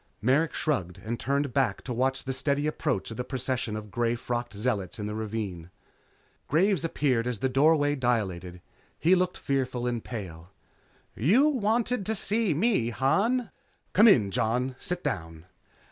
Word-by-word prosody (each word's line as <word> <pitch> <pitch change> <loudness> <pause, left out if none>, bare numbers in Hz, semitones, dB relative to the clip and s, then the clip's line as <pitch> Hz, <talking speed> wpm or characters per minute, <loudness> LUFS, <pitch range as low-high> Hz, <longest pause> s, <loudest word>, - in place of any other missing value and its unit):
Merrick 140 +8 +2
shrugged 100 - -1
and 115 +2 -3
turned 140 0 -1
back 135 -1 +1
to 125 - -4
watch 130 +2 0
the 130 - -3
steady 140 +2 0
approach 150 -8 -1
of 110 - -7
the 125 - -2
procession 130 -3 -2
of 105 -1 -7
grey 120 0 0
frocked 120 0 -4
zealots 105 -5 -2
in 105 - -4
the 105 - -4
ravine. 105 -6 -4 0.8
Graves 185 +2 +2
appeared 130 -7 0
as 125 -2 -2
the 130 - 0
doorway 145 +2 +3
dilated. 95 -9 -2 0.3
He 170 +4 +3
looked 180 -1 +1
fearful 130 -3 -1
and 120 -2 -2
pale. 90 -7 -7 0.7
"You 210 - +4
wanted 235 -2 0
to 220 - +1
see 215 0 +1
me, 190 - +2
Han?" 200 - +1 0.4
"Come 215 +4 +7
in, 110 - +5
Jon. 125 +3 0
Sit 180 -2 -3
down." 80 0 -4
130 Hz, 160 wpm, -27 LUFS, 110-160 Hz, 0.8 s, Come